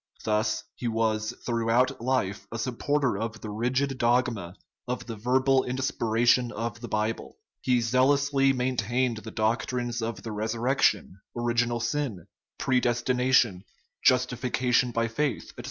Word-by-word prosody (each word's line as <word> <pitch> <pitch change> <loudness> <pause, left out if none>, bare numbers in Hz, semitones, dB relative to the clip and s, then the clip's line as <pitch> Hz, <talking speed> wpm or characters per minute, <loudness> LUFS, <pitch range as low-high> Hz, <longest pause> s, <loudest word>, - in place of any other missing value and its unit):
Thus 110 0 0
he 120 - -5
was 110 -1 0
throughout 120 +3 +1
life 105 -6 -1
a 115 - -4
supporter 125 0 0
of 115 0 -4
the 105 - -6
rigid 130 +5 -1
dogma 120 -7 +1 0.3
of 125 +1 -3
the 115 - -6
verbal 130 +4 +2
inspi 130 -2 -2
ration 120 +2 +3
of 115 -1 -4
the 120 - -6
Bible; 110 +1 -2 0.2
he 125 -2 +2
zealously 135 +3 +3
maintained 125 -1 0
the 110 0 -8
doc 110 +2 0
trines 120 -1 -2
of 115 0 -4
the 115 - -5
resurrection, 110 -2 0 0.2
original 120 0 +1
sin, 115 - -2 0.3
predestination, 125 -4 +2 0.4
justification 125 0 +2
by 115 -1 0
faith, 135 +5 -2
etc. - - -31
120 Hz, 135 wpm, -27 LUFS, 110-130 Hz, 0.4 s, ration